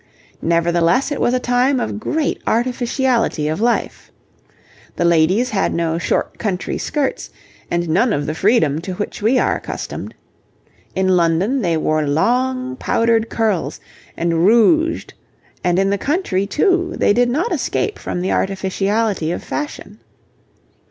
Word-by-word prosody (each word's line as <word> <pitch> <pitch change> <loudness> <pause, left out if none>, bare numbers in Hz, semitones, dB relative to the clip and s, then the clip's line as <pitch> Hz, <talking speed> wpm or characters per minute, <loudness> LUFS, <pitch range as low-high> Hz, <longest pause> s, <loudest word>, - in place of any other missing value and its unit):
Nevertheless 170 - +2
it 290 - -2
was 245 - +2
a - - +1
time 250 +2 +1
of 215 - -3
great 305 +6 -1
artificiality 240 - 0
of 155 +6 -2
life. 240 +1 -1 0.8
The 175 - 0
ladies 170 +9 +3
had 195 -3 0
no 165 -1 0
short 155 - -1
country 195 -5 -2
skirts, 290 -3 -2 0.4
and 175 0 -1
none 195 +9 +2
of 145 -6 -1
the 155 - -2
freedom 160 - +2
to 185 +2 -5
which 205 +3 -5
we 230 +5 +3
are - - +2
accustomed. - - -6 0.8
In 190 0 +1
London 180 +8 +2
they 170 -5 +1
wore 155 0 +1
long 255 - 0
powdered 230 -1 +1
curls 215 -6 -1 0.4
and 165 -1 0
rouged, 310 - +3 0.5
and 175 0 +1
in 195 +1 +2
the 200 - 0
country 270 - -1
too 355 - +1
they - - +3
did 245 +2 +2
not 310 - -1
escape 425 - -2
from 175 - -4
the 185 - -1
artificiality 195 -1 0
of - - -4
fashion. 230 -8 -6
210 Hz, 145 wpm, -19 LUFS, 170-250 Hz, 0.8 s, ladies